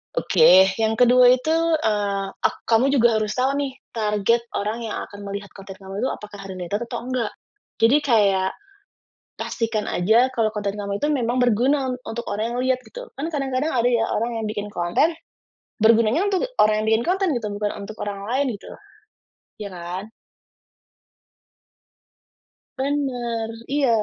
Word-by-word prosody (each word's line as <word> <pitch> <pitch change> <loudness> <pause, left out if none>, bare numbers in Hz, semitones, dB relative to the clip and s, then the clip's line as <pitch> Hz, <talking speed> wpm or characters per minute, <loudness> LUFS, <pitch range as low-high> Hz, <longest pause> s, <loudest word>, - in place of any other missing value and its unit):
Oke 190 - +6
yang 220 0 +1
kedua 245 +1 +6
itu, 285 +5 -2 0.3
eee, 205 -2 0 0.2
ek - - -8
kamu 230 +4 +4
juga 230 -3 +4
harus 215 0 -2
tahu 260 +2 +2
nih 275 -2 -2 0.2
target 215 +1 +1
orang 215 +3 -2
yang - - -4
akan 205 - -11
melihat 200 0 -6
konten 195 -1 -11
kamu 195 +1 -8
itu 260 - 0
apakah 205 -1 -10
ada 195 -1 -7
related 185 +3 -3
atau - - -4
enggak? 250 -4 -2 0.5
Jadi 240 +6 +6
kayak, 200 -7 +3 0.9
pastikan 225 -2 -2
saja 225 +8 +3
kalau 220 -2 +1
konten 205 -1 -3
kamu 200 0 -4
itu 295 - +1
memang 250 -3 0
berguna 255 +4 +2
un - - -2
untuk 235 +1 -5
orang 225 +3 -2
yang - - -3
lihat 260 -1 +1
gitu - - -10
kan 285 +4 -3
kadang-kadang 275 +1 -1
ada 240 0 +3
ya 235 -2 +2
orang 230 +1 -1
yang 220 - -3
bikin 210 -1 -4
konten, 175 - +1 0.7
bergunanya 230 - +4
untuk 385 +3 0 0.2
orang 215 0 +4
yang - - -3
bikin 225 +1 +2
konten 380 0 +1
gitu 235 -4 -2
bukan 205 0 -1 0.2
untuk 215 - -8
orang 200 -1 -5
lain 265 +4 0
gitu, - - -13 0.9
iya 205 - -4
kan. 175 +2 -5 2.8
Bener 245 -5 -2 0.2
iya, 285 -3 +2
225 Hz, 160 wpm, -22 LUFS, 205-255 Hz, 2.8 s, Oke